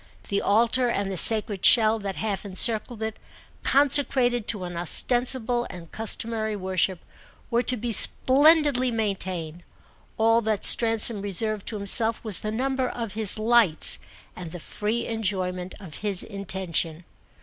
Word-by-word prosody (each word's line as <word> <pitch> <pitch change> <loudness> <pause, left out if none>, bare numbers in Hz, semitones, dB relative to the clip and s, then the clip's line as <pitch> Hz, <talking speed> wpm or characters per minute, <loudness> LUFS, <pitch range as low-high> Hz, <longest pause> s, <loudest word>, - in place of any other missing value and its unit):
The 200 - -2
altar 235 +4 +1
and 200 -4 -3
the - - -5
sacred 210 0 +5
shell 220 -1 +4
that 200 -2 -6
half 205 -3 -4
encircled 220 +3 +2
it, 220 -1 -6 0.4
consecrated 265 -4 +2
to 205 -5 -2
an 175 -1 -8
ostensible 240 +6 +1
and 175 -3 -12
customary 220 0 -5
worship, 185 -1 -2 0.5
were 235 +1 +1
to 250 0 +2
be 235 +2 -5
splendidly 280 +2 +3
maintained; 190 -7 -5 0.6
all 225 +1 +2
that 215 -2 -3
Stransom 225 -2 +2
reserved 205 +1 -3
to 225 - -5
himself 220 +3 +1
was 215 -5 0
the 215 - -6
number 260 +3 -3
of 230 -5 -7
his 215 -2 +1
lights 220 -6 +1 0.4
and 175 -3 -10
the 175 - -9
free 215 +7 -5
enjoyment 185 -5 -5
of 175 -8 -11
his 200 -3 +1
intention. 180 -4 -5
215 Hz, 140 wpm, -23 LUFS, 190-235 Hz, 0.6 s, sacred